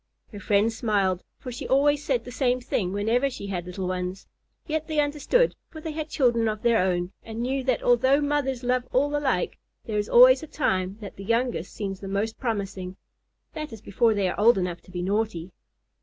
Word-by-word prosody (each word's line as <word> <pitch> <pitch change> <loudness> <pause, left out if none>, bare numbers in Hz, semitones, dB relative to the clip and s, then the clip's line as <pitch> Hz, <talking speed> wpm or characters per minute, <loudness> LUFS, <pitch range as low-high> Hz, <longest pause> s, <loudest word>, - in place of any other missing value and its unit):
Her 205 - -8
friends 210 +3 +2
smiled, 200 -5 0
for 255 - -8
she 240 - -6
always 290 +2 +3
said 250 -5 0
the 245 - -8
same 250 -1 +1
thing 210 -7 -2
whenever 225 +7 +1
she 240 - -7
had 180 -3 -4
little 185 +1 -4
ones. 185 +1 -3 0.4
Yet 315 -1 -2
they 310 -2 0
understood, 295 - +2
for 315 - -10
they 315 0 -5
had 310 0 -5
children 235 -6 +2
of 215 -1 -3
their 235 -1 +4
own, 180 -1 0
and 225 0 -8
knew 265 +2 -1
that 255 -3 +1
although 260 +3 +4
mothers 285 -3 -1
love 250 0 0
all 290 +3 +2
alike, 265 -11 0 0.3
there 210 -2 -1
is 205 - -3
always - - +8
a 315 - -8
time 190 -10 -1
when 205 - -7
the 195 - -9
youngest 230 -4 -1
seems 195 -2 -4
the 195 - -7
most 205 +3 -2
promising. 195 -6 -3 0.6
That 305 -2 -5
is 225 - -8
before 220 +3 +2
they 200 -2 +1
are - - -3
old 225 +1 +6
enough 180 -2 -2
to - - -15
be 175 0 -4
naughty. 195 -3 -1
230 Hz, 205 wpm, -26 LUFS, 195-270 Hz, 0.6 s, always